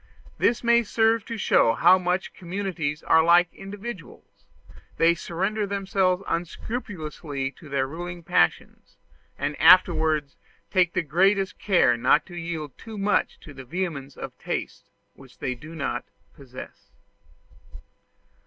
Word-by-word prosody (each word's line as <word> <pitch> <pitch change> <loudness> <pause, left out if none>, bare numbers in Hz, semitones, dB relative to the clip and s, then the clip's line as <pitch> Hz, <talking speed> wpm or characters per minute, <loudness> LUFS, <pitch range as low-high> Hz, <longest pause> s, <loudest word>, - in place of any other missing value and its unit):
This 235 +1 +2
may 235 0 +5
serve 225 0 +1
to 230 - -5
show 115 - +3
how 180 +9 +5
much 180 +1 -2
communities 175 -5 -4
are 160 0 +4
like 170 +1 +4
individuals; 200 -1 -10 0.5
they 165 +1 +5
surrender 195 +5 -2
themselves 195 -1 0
unscrupulously 165 - -4
to 155 +1 -15
their 135 -1 0
ruling 175 +4 -7
passions, 160 - 0 0.4
and 150 - -2
afterwards 160 -4 +4 0.3
take 180 -3 +2
the - - 0
greatest 190 +5 +1
care 155 - +3
not 130 +6 +3
to 175 - -12
yield 165 -4 -5
too 220 -2 -9
much 205 +1 0
to 150 - -12
the 130 -1 -10
vehemence 145 -2 -4
of - - -7
tastes - - -5 0.2
which 135 -2 -17
they 130 - -2
do 155 +7 -11
not 140 -5 -3 0.3
possess. 130 -2 -12
170 Hz, 130 wpm, -25 LUFS, 150-195 Hz, 0.5 s, may